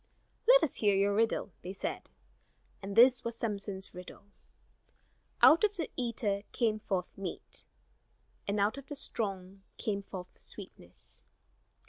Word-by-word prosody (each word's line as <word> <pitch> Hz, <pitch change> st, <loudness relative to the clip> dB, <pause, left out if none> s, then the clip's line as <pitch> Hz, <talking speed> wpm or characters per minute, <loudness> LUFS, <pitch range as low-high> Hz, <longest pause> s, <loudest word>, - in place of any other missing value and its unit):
"Let -, -, +8 dB
us 295 Hz, -, +1 dB
hear 205 Hz, -2 st, +3 dB
your 200 Hz, +1 st, +2 dB
riddle," 220 Hz, -1 st, +1 dB
they 180 Hz, +2 st, -6 dB
said. 195 Hz, -, -5 dB, 0.7 s
And 195 Hz, 0 st, -6 dB
this 245 Hz, +2 st, +7 dB
was 235 Hz, 0 st, -4 dB
Samson's 200 Hz, -4 st, -4 dB
riddle: 180 Hz, +2 st, -10 dB, 1.2 s
"Out 330 Hz, +4 st, +8 dB
of 415 Hz, -1 st, +2 dB
the 330 Hz, -, -3 dB
eater 230 Hz, -5 st, -1 dB
came 220 Hz, -3 st, +1 dB
forth 190 Hz, -4 st, -3 dB
meat, 195 Hz, -3 st, -5 dB, 0.8 s
And 200 Hz, +1 st, 0 dB
out 210 Hz, +7 st, +1 dB
of 275 Hz, -, -14 dB
the 290 Hz, -, -6 dB
strong 195 Hz, -7 st, -2 dB, 0.2 s
came 200 Hz, -2 st, -2 dB
forth 185 Hz, -2 st, -9 dB
sweetness." -, -, -12 dB
205 Hz, 135 wpm, -32 LUFS, 195-235 Hz, 1.2 s, Let